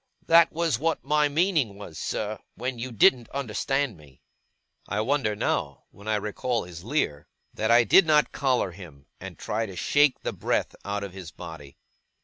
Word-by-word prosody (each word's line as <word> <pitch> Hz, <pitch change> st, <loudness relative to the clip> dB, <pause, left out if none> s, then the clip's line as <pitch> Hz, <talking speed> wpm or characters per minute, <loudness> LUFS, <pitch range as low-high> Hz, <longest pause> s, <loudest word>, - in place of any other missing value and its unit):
That 170 Hz, +1 st, +6 dB
was 165 Hz, -6 st, 0 dB
what 165 Hz, +2 st, -1 dB
my 150 Hz, +1 st, +2 dB
meaning 150 Hz, -, +1 dB
was, 90 Hz, -6 st, -9 dB
sir, 105 Hz, 0 st, -3 dB, 0.2 s
when 125 Hz, +1 st, -4 dB
you 125 Hz, +2 st, -4 dB
didn't 120 Hz, +2 st, +4 dB
understand 135 Hz, -2 st, -1 dB
me.' 70 Hz, -4 st, -19 dB, 0.6 s
I 105 Hz, -, -2 dB
wonder 115 Hz, -3 st, 0 dB
now, 70 Hz, -7 st, -2 dB
when 100 Hz, +2 st, -14 dB
I 110 Hz, -, +2 dB
recall 110 Hz, +3 st, -2 dB
his 85 Hz, -1 st, -10 dB
leer, 105 Hz, -, -1 dB, 0.3 s
that 110 Hz, -, -1 dB
I 120 Hz, +1 st, +6 dB
did 165 Hz, -, +6 dB
not 150 Hz, -1 st, +4 dB
collar 130 Hz, -8 st, 0 dB
him, 80 Hz, -7 st, -13 dB
and 95 Hz, -2 st, -9 dB
try 110 Hz, +1 st, -2 dB
to 95 Hz, -, -9 dB
shake 145 Hz, +8 st, +3 dB
the -, -, -3 dB
breath -, -, -1 dB
out 100 Hz, 0 st, -3 dB
of 100 Hz, -3 st, -7 dB
his 95 Hz, -4 st, -8 dB
body. 75 Hz, -3 st, -10 dB
110 Hz, 175 wpm, -26 LUFS, 95-140 Hz, 0.6 s, That